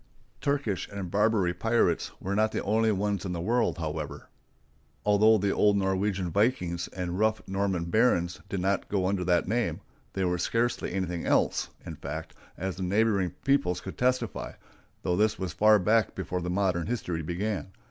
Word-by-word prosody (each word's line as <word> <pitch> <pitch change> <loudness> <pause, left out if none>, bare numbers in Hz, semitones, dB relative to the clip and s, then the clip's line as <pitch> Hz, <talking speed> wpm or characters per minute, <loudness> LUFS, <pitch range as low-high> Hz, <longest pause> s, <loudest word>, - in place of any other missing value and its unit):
Turkish 140 -9 -1
and 100 -3 -5
Barbary 105 -3 +2
pirates 115 +6 +1
were 95 - -3
not 110 +2 +2
the - - -2
only 110 +2 +2
ones 100 -1 -1
in 95 -2 -3
the 85 - -3
world, 115 +8 +1
however. 75 -3 -5 0.7
Although 105 +2 +5
the 100 0 +1
old 105 -1 +3
Norwegian 95 -1 0
vikings 90 -5 +1
and 90 0 -4
rough 110 0 +1
Norman 95 -3 -1
barons 90 -3 +2
did 95 -3 -2
not 95 +1 0
go 95 -2 0
under 95 -1 0
that 90 -1 +2
name, 120 +4 0 0.3
they 95 -1 0
were 90 -1 0
scarcely 115 +6 0
anything 90 -2 -2
else, - - +2 0.2
in - - -7
fact, - - -6 0.2
as 95 0 -3
the - - -6
neighboring 100 0 +2 0.2
peoples 90 -11 +2
could 95 - -8
testify, 125 +1 0 0.5
though 90 - +1
this 105 +3 +2
was 95 -4 -4
far 105 +3 +6
back 105 +3 +2
before 90 -1 -3
modern 90 -1 0
history 90 -8 -2
began. 95 +4 -3
95 Hz, 170 wpm, -28 LUFS, 90-110 Hz, 0.7 s, far